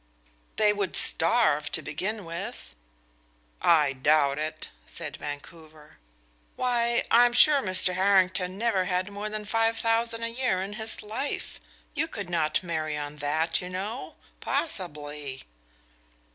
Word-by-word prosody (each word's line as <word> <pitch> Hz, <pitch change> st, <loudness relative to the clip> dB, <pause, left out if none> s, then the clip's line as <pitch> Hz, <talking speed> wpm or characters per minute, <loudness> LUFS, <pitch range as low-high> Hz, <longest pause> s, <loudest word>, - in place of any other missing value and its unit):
"They 210 Hz, -1 st, +4 dB
would 200 Hz, -3 st, -2 dB
starve, 165 Hz, -4 st, +4 dB
to -, -, 0 dB
begin 190 Hz, +8 st, -4 dB
with." 165 Hz, -, -7 dB, 0.9 s
"I 150 Hz, -5 st, +4 dB
doubt 140 Hz, +1 st, +2 dB
it," 155 Hz, +1 st, -5 dB, 0.2 s
said -, -, -7 dB
Vancouver. 155 Hz, +1 st, -10 dB, 0.6 s
"Why, 240 Hz, -1 st, +1 dB
I 240 Hz, +1 st, +7 dB
am 240 Hz, -, -4 dB
sure 285 Hz, +3 st, +6 dB
Mr. 185 Hz, -3 st, +3 dB
Harrington 185 Hz, -1 st, +2 dB
never 210 Hz, -4 st, +1 dB
had 185 Hz, +2 st, -1 dB
more 205 Hz, +1 st, -5 dB
than 215 Hz, 0 st, -5 dB
five 225 Hz, +1 st, +1 dB
thousand 230 Hz, 0 st, 0 dB
a -, -, +1 dB
year 240 Hz, -5 st, 0 dB
in 200 Hz, +2 st, -6 dB
his 220 Hz, +1 st, -3 dB
life. 225 Hz, +7 st, -4 dB, 0.3 s
You 320 Hz, +2 st, 0 dB
could 200 Hz, -, -6 dB
not 155 Hz, 0 st, 0 dB
marry 155 Hz, -3 st, -3 dB
on 145 Hz, 0 st, -6 dB
that, 155 Hz, +3 st, 0 dB
you 180 Hz, -, -6 dB
know 200 Hz, +7 st, -5 dB, 0.2 s
possibly." 150 Hz, -, -4 dB
185 Hz, 135 wpm, -27 LUFS, 155-225 Hz, 0.9 s, I